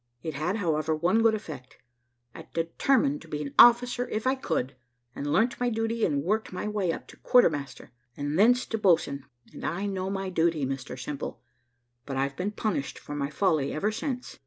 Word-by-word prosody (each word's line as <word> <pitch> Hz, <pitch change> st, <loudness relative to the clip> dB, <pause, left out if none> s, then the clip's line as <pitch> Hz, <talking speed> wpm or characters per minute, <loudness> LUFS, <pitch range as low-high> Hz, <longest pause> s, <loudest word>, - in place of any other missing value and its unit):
It 160 Hz, -, -3 dB
had, 155 Hz, +7 st, -1 dB
however, 160 Hz, -6 st, 0 dB
one 180 Hz, +8 st, +2 dB
good 225 Hz, -1 st, +4 dB
effect; 145 Hz, -, -9 dB, 0.6 s
I -, -, -11 dB
determined 270 Hz, -, +1 dB
to -, -, -13 dB
be 150 Hz, -, -4 dB
an 140 Hz, -, -7 dB
officer 245 Hz, +1 st, +6 dB
if 215 Hz, +2 st, -3 dB
I 260 Hz, -, +3 dB
could, 160 Hz, -, -2 dB, 0.4 s
and 145 Hz, +1 st, -4 dB
learnt 225 Hz, +9 st, +2 dB
my 245 Hz, 0 st, +1 dB
duty, 225 Hz, 0 st, -1 dB
and 140 Hz, -4 st, 0 dB
worked 215 Hz, +6 st, -1 dB
my 185 Hz, +3 st, -4 dB
way 205 Hz, -5 st, 0 dB
up -, -, -6 dB
to -, -, -14 dB
quarter 245 Hz, -8 st, +5 dB
master, 140 Hz, -4 st, -7 dB, 0.3 s
and 145 Hz, +1 st, -2 dB
thence 245 Hz, +4 st, +5 dB
to 225 Hz, -, -3 dB
boatswain 160 Hz, -8 st, +2 dB, 0.3 s
and -, -, -10 dB
I 195 Hz, +5 st, -2 dB
know 190 Hz, -1 st, -2 dB
my 195 Hz, -1 st, -3 dB
duty, 165 Hz, -4 st, +1 dB
Mr 130 Hz, -1 st, -5 dB
Simple. 140 Hz, +2 st, -6 dB, 0.6 s
But 135 Hz, -2 st, -3 dB
I've 140 Hz, +1 st, -1 dB
been 185 Hz, +6 st, -2 dB
punished 210 Hz, -, -2 dB
for 145 Hz, -, -8 dB
my 140 Hz, -1 st, -2 dB
folly 155 Hz, -3 st, +1 dB
ever 205 Hz, +8 st, 0 dB
since. 250 Hz, +2 st, -5 dB
180 Hz, 195 wpm, -27 LUFS, 145-220 Hz, 0.6 s, officer